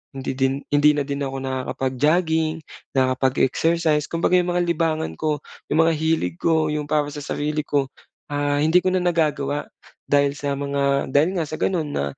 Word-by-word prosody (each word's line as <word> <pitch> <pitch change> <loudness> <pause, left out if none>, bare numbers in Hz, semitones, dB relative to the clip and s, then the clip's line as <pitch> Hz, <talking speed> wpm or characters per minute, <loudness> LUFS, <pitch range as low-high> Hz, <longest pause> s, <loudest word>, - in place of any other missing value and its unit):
hindi 135 - -3
din 135 +1 +1
hindi 150 +1 +5
na 145 - 0
din 140 0 -3
ako 135 0 -4
nakakapag-jogging, 155 +5 0 0.4
nakakapag-exercise. 140 +4 +2
Kumbaga 170 +2 +2
'yong 175 - -1
mga 175 0 +1
libangan 165 -2 0
ko, 150 -2 -1 0.3
yung 160 +2 +4
mga 165 - +3
hilig 160 - 0
ko, 160 -2 +2
yung 150 -1 -2
para 150 -1 +1
sa 145 - -6
sarili 150 +1 -2
ko, 140 -2 0 0.4
ah, 145 0 0
hindi 165 +3 +5
ko 185 0 +1
na 185 - +1
nagagawa 150 -4 0 0.4
dahil 140 -1 +3
sa 140 -1 -1
mga 140 -1 0
dahil 155 +8 +3
nga 165 - 0
sa 155 - -4
gano'n 165 -6 0
na 70 - -1
150 Hz, 175 wpm, -22 LUFS, 140-160 Hz, 0.4 s, hindi